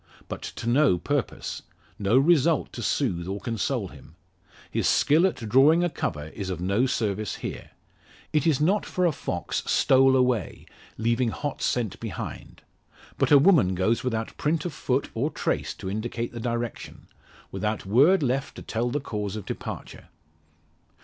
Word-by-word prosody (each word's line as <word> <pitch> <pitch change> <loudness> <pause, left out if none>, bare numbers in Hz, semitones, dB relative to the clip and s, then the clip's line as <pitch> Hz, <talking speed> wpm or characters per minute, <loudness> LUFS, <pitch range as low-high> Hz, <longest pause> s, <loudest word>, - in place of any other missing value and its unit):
But - - -6
to - - -6
no 125 -4 +4
purpose; 140 +7 -3 0.4
no 105 +4 +3
result 160 +2 +3
to 120 - -6
soothe 95 -8 -1
or 100 +2 -3
console 115 -4 -2
him. 80 - -15 0.6
His - - 0
skill 160 +6 +4
at 185 - -3
drawing 145 +9 +5
a 175 - 0
cover 75 - -3
is 95 +3 -6
of 90 -3 -3
no 100 +8 +1
service 105 -4 -1
here. - - -7 0.6
It 150 0 +2
is 150 -5 +3
not 190 +8 +2
for 180 - -1
a 170 - +4
fox 90 - -3
"stole 135 0 +4
away," 125 - 0 0.3
leaving 115 +2 +1
hot 145 +5 -4
scent 115 -6 -1
behind; - - -7 0.6
but - - +2
a 145 - +9
woman 140 - +4
goes 110 +6 +1
without 115 -3 -2
print 155 +1 0
of 175 - -3
foot 130 +1 -1
or 130 +7 0
trace - - -2
to - - -8
indicate 115 +4 -3
the 120 - -6
direction; 120 0 -4 0.5
without 105 -1 -2
word 145 - +4
left 135 +1 -1
to - - -9
tell 120 +2 -1
the 145 +4 -2
cause 105 -5 -4
of 105 - -6
departure. - - -7
120 Hz, 165 wpm, -26 LUFS, 105-145 Hz, 0.6 s, a